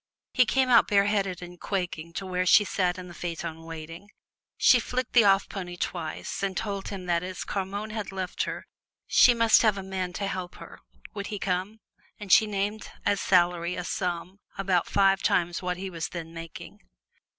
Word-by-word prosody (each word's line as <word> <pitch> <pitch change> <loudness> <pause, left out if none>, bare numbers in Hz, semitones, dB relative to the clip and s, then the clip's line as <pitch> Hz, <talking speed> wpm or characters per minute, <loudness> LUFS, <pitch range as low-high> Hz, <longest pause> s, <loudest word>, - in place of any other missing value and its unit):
He 250 - +5
came 265 -1 +2
out 235 -2 +6
bareheaded 200 -3 +1
and 175 0 -11
quaking 175 -4 -3
to 195 - -4
where 185 0 -1
she 210 - +7
sat 185 -2 0
in 180 0 -8
the 175 - -10
phaeton 165 -1 -5
waiting. 165 +4 -9 0.5
She 250 - +6
flecked 250 +1 -3
the 235 -3 +6
off 195 0 +4
pony 180 -3 -6
twice 165 -3 -4
and 195 -2 -2
told 200 -2 -3
him 195 -3 -6
that 170 -1 +1
as 185 0 -5
Carmonne 200 +2 -4
had 215 -3 -4
left 190 -1 -4
her - - -6 0.4
she 245 - +6
must 230 -1 +5
have 215 -3 +3
a 195 - -5
man 190 -1 -3
to 200 - -3
help 185 -2 -4
her. - - -12 0.3
Would 200 -1 -5
he 210 - -4
come? 195 +3 -2 0.4
And 205 -3 -6
she 220 - +7
named 205 +1 -3 0.2
as 205 -1 +1
salary 175 -1 +2
a 180 - -4
sum 180 +1 -3 0.2
about 190 -3 +1
five 195 -1 +3
times 175 -1 +1
what 180 -1 -2
he 190 +1 -5
was 165 -2 -4
then 165 -2 -7
making. 165 0 -9
190 Hz, 190 wpm, -27 LUFS, 175-205 Hz, 0.5 s, she